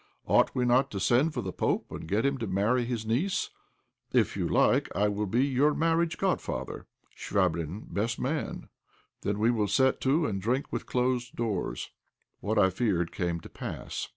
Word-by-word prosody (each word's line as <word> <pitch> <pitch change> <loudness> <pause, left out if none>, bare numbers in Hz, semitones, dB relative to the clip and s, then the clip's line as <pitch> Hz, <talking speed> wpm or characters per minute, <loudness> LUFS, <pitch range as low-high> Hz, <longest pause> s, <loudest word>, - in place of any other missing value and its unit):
Ought - - +3
we 125 - +1
not 125 +2 +3
to 100 - -4
send 125 - +3
for 125 -6 -3
the 95 - -4
pope - - -1
and - - -7
get 105 +8 +1
him 140 -1 +1
to 115 - -3
marry 105 +6 +1
his 115 -2 -3
niece? 135 - 0 0.6
If - - +2
you - - -1
like - - +3
I 105 - +3
will 105 +1 -2
be 120 +7 +2
your 140 +2 +2
marriage 165 0 +1
godfather, - - -2 0.3
Chvabrine 85 +5 -1
best 115 +3 -1
man; 150 +5 -3 0.5
then 100 0 -1
we 110 +3 +3
will 110 -3 +1
set 130 +6 +2
to 150 +5 +2
and 95 -5 -2
drink 125 +7 -1
with - - -3
closed 125 0 0
doors." 110 -6 -2 0.5
What 110 +2 -1
I 95 -2 +5
feared 95 -5 0
came 85 -2 -2
to - - -11
pass. - - -5
115 Hz, 180 wpm, -29 LUFS, 100-130 Hz, 0.6 s, I